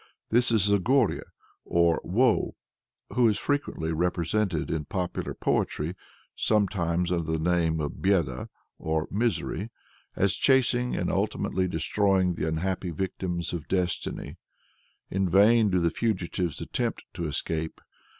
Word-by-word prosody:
This 120 +1 +3
is 105 -4 +3
Goré, 110 +4 +3 0.4
or 85 -1 +2
Woe, 115 +5 +2 0.6
who 120 -1 +4
is 105 - 0
frequently 140 - -1
represented 90 +1 0
in 80 -2 -2
popular 90 +2 -3
poetry 80 +5 -1 0.4
sometimes 90 -5 +1
under 85 -3 -1
the 80 - +1
name 80 -1 +1
of 75 -1 -4
Béda 85 -10 +1 0.3
or 80 0 -1
Misery 105 -2 -1 0.5
as 100 -1 +2
chasing 125 +1 +3
and - - -1
ultimately 95 -1 0
destroying 95 +2 +1
the 80 - -2
unhappy 90 +3 -1
victims 90 0 -3
of 85 -3 -5
destiny. 90 -2 -2 0.7
In 95 -1 +1
vain 105 +4 +5
do 90 -1 +2
the 85 -1 +2
fugitives 90 -6 -1
attempt - - -2
to 85 - -3
escape. 80 +2 -3
90 Hz, 125 wpm, -27 LUFS, 85-105 Hz, 0.7 s, vain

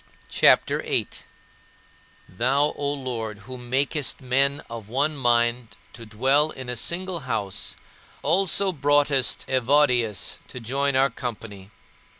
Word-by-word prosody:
CHAPTER - - +4
VIII - - -1
17. - - -10 1.1
Thou, 140 +5 +2
O 145 -1 -2
Lord, 120 -6 -5
who 130 +2 -8
makest 135 +3 -1
men 135 +2 0
of 115 -3 -9
one 140 +5 0
mind 120 -2 0 0.2
to 115 -2 -11
dwell 135 +8 +2
in 130 -4 -8
a 125 - -2
single 175 +8 -1
house, 105 -8 -4 0.5
also 190 +4 +2
broughtest 145 -5 +2
Evodius 125 -4 +2
to 125 - -8
join 135 +4 -1
our 135 +1 +3
company. 105 -5 -7
130 Hz, 125 wpm, -24 LUFS, 120-145 Hz, 1.1 s, CHAPTER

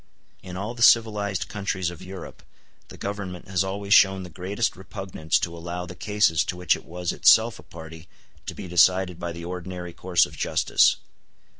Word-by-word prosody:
In 90 0 -8
all 105 +5 -4
the 120 - -10
civilized 105 -5 +3
countries 95 -4 -3
of 85 - -12
Europe 95 -1 -10 0.5
the - - -12
Government 100 -3 -6
has 95 -1 0
always 100 +1 -1
shown 95 -2 +5
the 90 - -10
greatest 95 +7 -2
repugnance 95 -3 -2
to 85 -1 -3
allow 85 +1 -5
the 90 - -9
cases 100 -4 +1
to 90 - -4
which 90 -1 +2
it - - -12
was 90 0 -4
itself 110 -4 +4
a - - -10
party 80 +1 -12 0.4
to - - -5
be 95 - -8
decided 90 +1 +3
by 85 -1 -4
the 85 0 -8
ordinary 90 0 -6
course 90 -1 +2
of - - -12
justice. - - +3
90 Hz, 180 wpm, -24 LUFS, 85-100 Hz, 0.5 s, shown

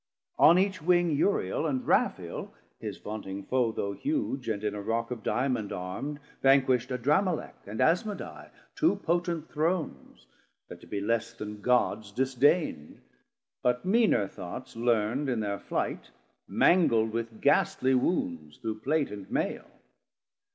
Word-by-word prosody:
On 170 +3 +8
each 190 -2 +1
wing 175 +1 +3
Uriel 150 - +1
and 130 -4 -2
Raphael - - 0 0.2
his - - -5
vaunting 100 -2 -6
foe, 125 -1 +1
Though 100 -2 -2
huge, 280 - -2
and 105 -1 -2
in 105 -1 -1
a 105 - -5
Rock 115 +3 -2
of 120 -3 -4
Diamond 120 -1 0
Armd, 95 +12 -4 0.2
Vanquish'd 135 -2 +4
Adramelec, 150 +8 +1
and 105 +2 -6
Asmadai, 165 - 0 0.3
Two - - +3
potent 170 -1 -1
Thrones, 160 +2 -2 0.4
that - - -10
to - - -14
be 100 - -3
less 115 +2 0
then 105 -1 -7
Gods 110 -4 +1
Disdain'd, 130 - +1 0.6
but 125 +5 +1
meaner 210 - +3
thoughts 95 +8 -8
learnd 120 +4 +1
in 120 -3 0
thir 100 -1 -2
flight, - - -3 0.4
Mangl'd 115 -11 +4
with 115 -1 -4
gastly 130 +1 +3
wounds 85 - -1
through 110 -1 -4
Plate 145 +4 0
and 100 -2 -8
Maile. - - -2
125 Hz, 135 wpm, -29 LUFS, 105-155 Hz, 0.6 s, On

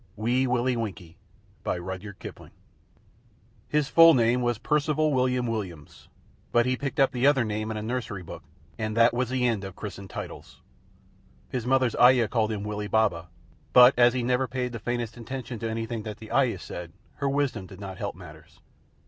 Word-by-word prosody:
WEE 120 +5 +1
WILLIE 125 0 +1
WINKIE 95 -7 -5 0.5
"An - - -1
officer 90 +2 -6
and 95 +2 -6
a 100 - -7
gentleman." - - -10 1.2
His 150 -2 +1
full 165 +1 +7
name 120 +1 +3
was 120 -2 0
Percival 150 +2 +1
William 125 -1 +1
Williams, 95 -10 -6 0.4
but 120 0 +3
he 130 0 +1
picked 135 +3 -4
up 135 -1 +4
the 130 0 +2
other 140 -4 +4
name 110 0 -3
in 110 - -3
a 105 - -4
nursery 110 -5 -4
book, 85 - -9 0.4
and 110 0 -3
that 115 +1 +5
was 125 0 -1
the 130 -1 0
end 110 -4 -1
of 95 -1 -7
the - - -19
christened 100 -2 -7
titles. - - -9 0.9
His 125 -2 -3
mother's 130 -2 +2
ayah 125 -2 +6
called 110 -2 +1
him 105 -2 -3
Willie 105 0 -4
Baba, 95 -6 +1 0.4
but 125 +1 +9
as 120 0 +5
he 125 - -1
never 125 +2 +1
paid 125 -1 -3
the 115 - -6
faintest 120 0 -3
attention 125 0 -6
to 115 - -3
anything 115 0 -3
that 105 -1 -7
the 110 - -11
ayah 130 -7 +2
said, 85 -2 -8 0.2
her 140 -1 -1
wisdom 140 -8 -1
did 95 -1 -12
not 95 -1 -8
help 100 -3 -4
matters. 80 -4 -14
120 Hz, 195 wpm, -26 LUFS, 105-125 Hz, 1.2 s, but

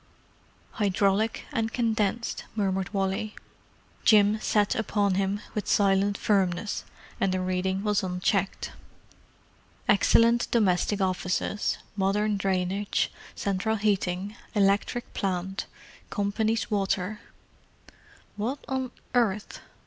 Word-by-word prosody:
——" - - -33
"Hydraulic 200 +2 +1
and 225 0 0
condensed," 225 -1 0
murmured 195 -3 0
Wally. 195 +1 -1 0.7
Jim 210 0 +5
sat 210 -1 +2
upon 205 -3 +1
him 195 +2 0
with 210 - -3
silent 200 0 +3
firmness, 195 0 0 0.4
and 195 - +2
the 185 - 0
reading 185 +1 -1
was 210 -1 +2
unchecked. 185 +1 -1 1.2
"Excellent 230 +3 +4
domestic 205 -2 +2
offices, 185 +2 0 0.2
modern 205 +2 +1
drainage, 195 +1 0 0.2
central 200 +3 0
heating, 200 -1 0 0.2
electric 205 +4 +1
plant, 190 0 -2 0.4
Company's 220 +3 0
water——" 200 0 0 1.2
"What 235 +7 -1
on 260 -1 -2 0.2
earth——?" 210 -5 0
200 Hz, 95 wpm, -27 LUFS, 190-215 Hz, 1.2 s, Jim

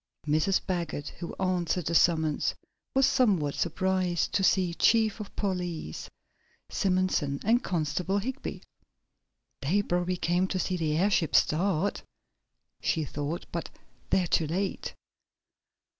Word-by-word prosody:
Mrs. 155 +6 +2
Baggert, 170 -5 -3
who 170 - -6
answered 180 -2 0
the 170 - -1
summons, 160 -3 +2 0.4
was 270 0 +5
somewhat 190 - +2
surprised 185 0 0
to 195 - +2
see 185 -2 +3
Chief 220 +3 +3
of 210 - -8
Police 180 - -3 0.6
Simonson 185 -7 +1
and 235 +4 +3
Constable 175 +3 -1
Higby. 260 +7 -4 1.0
"They 180 +9 +2
probably 180 0 0
came 175 +2 +1
to 185 - -2
see 185 0 -1
the 155 -3 0
airship 185 -3 +2
start," 185 +3 +2 0.8
she 160 -3 0
thought, 145 +4 -4
"but 170 - -4 0.4
they're 185 - +3
too 165 -1 +1
late." 190 +5 -2
180 Hz, 120 wpm, -28 LUFS, 160-195 Hz, 1.0 s, was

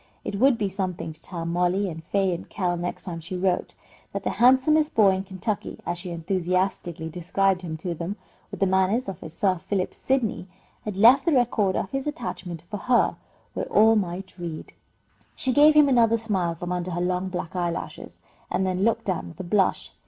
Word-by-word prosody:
It 200 - -4
would 260 0 +5
be 210 -3 0
something 185 -4 -4
to 155 - -11
tell 170 -3 -5
Mollie 180 +4 +1
and 165 -2 -6
Fay 190 0 +1
and 170 - -7
Kell 180 -3 -1
next 175 +1 -4
time 170 -3 -5
she 175 +3 -5
wrote, 180 -1 0 0.4
that - - -3
the - - 0
handsomest 265 +5 +4
boy 205 -3 +6
in 190 0 -1
Kentucky 195 +2 -4
(as 175 0 -2
she 180 0 -6
enthusiastically 175 -1 -1
described 180 +3 0
him 160 -3 -5
to 170 +2 -4
them), 170 +4 -4 0.3
with - - -9
the - - +5
manners 190 +6 +2
of 190 -4 -6
a - - -7
Sir 185 +2 0
Philip 190 +1 -2
Sidney, 240 -8 -1 0.4
had 210 -3 -4
left 235 +9 +7
the 335 - +3
record 230 -7 +2
of 190 - -2
his 270 +1 -3
attachment 180 - -5
for 205 +4 -6
her 245 +4 +2 0.4
where - - -3
all 220 +2 +6
might 190 -1 -3
read. 170 -3 -6 0.6
She 260 - +1
gave 300 +2 +6
him 300 -1 +7
another 230 -4 +4
smile 190 -7 -1
from 175 +1 -5
under 180 0 -2
her 175 0 -2
long 180 +1 -1
black 175 -2 -5
eyelashes, 175 -2 -4 0.3
and 190 - 0
then 185 0 0
looked 230 +1 +1
down 185 -4 -2
with 165 - -13
a - - -3
blush. 190 +2 +1
190 Hz, 200 wpm, -25 LUFS, 175-215 Hz, 0.6 s, left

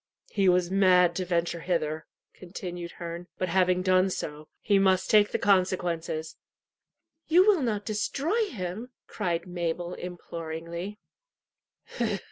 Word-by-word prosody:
"He 195 -3 +3
was 180 0 +2
mad 185 -2 +5
to 185 - -1
venture 170 -1 0
hither," 160 -3 -2 0.3
continued 175 -1 -7
Herne; 170 0 -7
"but 185 - -1
having 185 0 +2
done 185 0 +4
so, 150 -4 -5
he 200 -2 +3
must 190 -1 +2
take 210 -1 +6
the - - -1
consequences." 175 -5 0 0.9
"You 355 +4 +6
will 410 -6 +4
not 215 -5 -1
destroy 280 - 0
him?" 210 - -5 0.2
cried 175 -5 -2
Mabel 175 0 -3
imploringly. 170 +2 -6
180 Hz, 120 wpm, -28 LUFS, 170-195 Hz, 0.9 s, take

